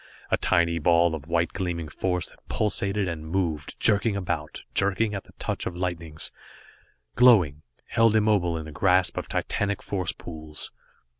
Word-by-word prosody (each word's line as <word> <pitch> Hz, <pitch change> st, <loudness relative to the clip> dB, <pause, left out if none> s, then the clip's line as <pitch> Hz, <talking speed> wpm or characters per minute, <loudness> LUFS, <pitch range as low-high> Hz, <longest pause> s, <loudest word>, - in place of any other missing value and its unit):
A -, -, +4 dB
tiny 85 Hz, -2 st, +2 dB
ball 85 Hz, +1 st, +4 dB
of 75 Hz, -2 st, -6 dB
white 85 Hz, 0 st, +1 dB
gleaming 85 Hz, -3 st, -3 dB
force 90 Hz, +3 st, -2 dB
that -, -, -20 dB
pulsated, 100 Hz, -2 st, 0 dB
and 85 Hz, -3 st, -4 dB
moved, 80 Hz, -5 st, -2 dB
jerking 105 Hz, 0 st, +3 dB
about, 80 Hz, -6 st, -3 dB
jerking 100 Hz, +2 st, +2 dB
at 100 Hz, -, -5 dB
the -, -, -18 dB
touch -, -, -3 dB
of 85 Hz, -, -5 dB
lightnings, 85 Hz, -4 st, -2 dB, 0.8 s
glowing, 95 Hz, -, +5 dB, 0.2 s
held 115 Hz, -1 st, +3 dB
immobile 105 Hz, -6 st, +2 dB
in 80 Hz, -, -6 dB
the 80 Hz, -, -8 dB
grasp 90 Hz, +4 st, +2 dB
of -, -, -4 dB
titanic 100 Hz, 0 st, -1 dB
force 95 Hz, -4 st, -1 dB
pools. 80 Hz, -2 st, -8 dB
90 Hz, 155 wpm, -26 LUFS, 80-100 Hz, 0.8 s, glowing